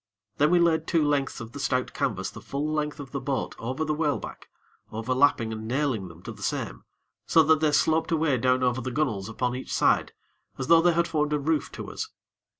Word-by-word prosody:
Then 150 +1 +4
we 180 - +4
laid 165 -2 +2
two 165 -3 +2
lengths 145 -2 0
of 115 -1 -8
the 145 - -8
stout 130 -2 -1
canvas - - -2
the - - -10
full 140 +2 -3
length 150 0 -2
of 135 -2 -8
the 140 - -3
boat 135 0 -2
over 130 +7 -2
the 155 - 0
whaleback, 150 -2 -3 0.4
overlapping 115 0 +2
and 110 0 -6
nailing 130 -6 0
them 85 0 -14
to - - -6
the - - -12
same, - - -3 0.4
so 160 - +6
that 155 0 +4
they 155 -1 +2
sloped 160 +2 +2
away 155 -5 +2
down 130 +1 +2
over 125 0 +1
the 130 - -3
gunnels 115 -8 -1
upon 125 +2 -1
each 130 - -6
side - - +2 0.4
as 130 - -3
though 165 +4 +6
they 175 0 +4
had 170 +1 +2
formed 150 -1 0
a 150 - +1
roof 155 +1 0
to - - -7
us. - - -5
145 Hz, 220 wpm, -26 LUFS, 125-155 Hz, 0.4 s, so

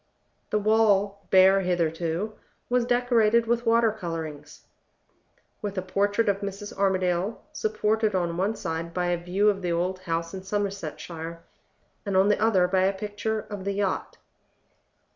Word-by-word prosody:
The 210 - +1
wall, 205 -2 +2
bare 190 +1 +6
hitherto, 175 +2 -1 0.4
was 250 -1 +3
decorated 235 -2 +3
with 235 +1 0
water 230 -1 +4
color 170 -6 -4
drawings 150 -2 -10 1.0
with 205 -2 -4
a 185 - -1
portrait 205 +4 +1
of 200 -1 +2
Mrs. 200 +1 -6
Armadale 190 +1 0
supported 215 -1 0
on 170 -2 0
one 195 +5 0
side 165 -2 -4
by 180 -1 0
a 175 -1 -1
view 190 +4 +1
of 200 -2 +2
the 175 -2 -1
old 180 +2 -1
house 165 -1 -3
in 190 - -5
Somersetshire, 170 -4 -4 0.6
and 200 -2 0
on 195 +2 +5
the 210 - +2
other 195 -5 +4
by 185 +1 +2
a 195 - +2
picture 215 +2 -3
of 205 -3 -8
the 200 +1 -1
yacht. 195 -1 -2
195 Hz, 155 wpm, -26 LUFS, 180-210 Hz, 1.0 s, bare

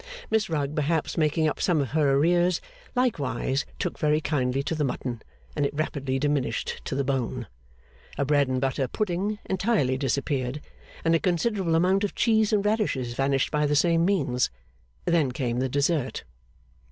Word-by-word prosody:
Miss 220 -1 +2
Rugg, 150 -2 -1
perhaps 155 +1 0
making 155 0 +2
up 150 - -2
some 175 -4 +2
of 135 -4 -1
her 145 -2 +3
arrears, 175 +3 +3 0.4
likewise 145 - 0
took 180 - -3
very 150 -1 +3
kindly 135 -3 0
to 165 - -2
the 155 -2 0
mutton, 125 -3 -3 0.3
and - - 0
it 140 - -1
rapidly 140 -3 -1
diminished 140 -4 -1
to - - -3
the 140 - +1
bone. 130 -3 -2 0.7
A 140 - +1
bread 145 -1 +3
and 130 0 0
butter 135 0 0
pudding 205 +3 -1
entirely 190 - +1
disappeared, 135 0 -1 0.5
and 165 - +4
a 165 - +4
considerable 180 -1 +1
amount 185 +4 +3
of 205 - -2
cheese 220 -2 +3
and 205 -2 +2
radishes 200 - 0
vanished 135 +1 +1
by 150 -1 +2
the 150 - +1
same 165 +2 +3
means. 145 -10 +1 0.6
Then 160 -6 +2
came 125 -2 -2
the 130 0 0
dessert. 140 0 0
150 Hz, 165 wpm, -26 LUFS, 135-175 Hz, 0.7 s, and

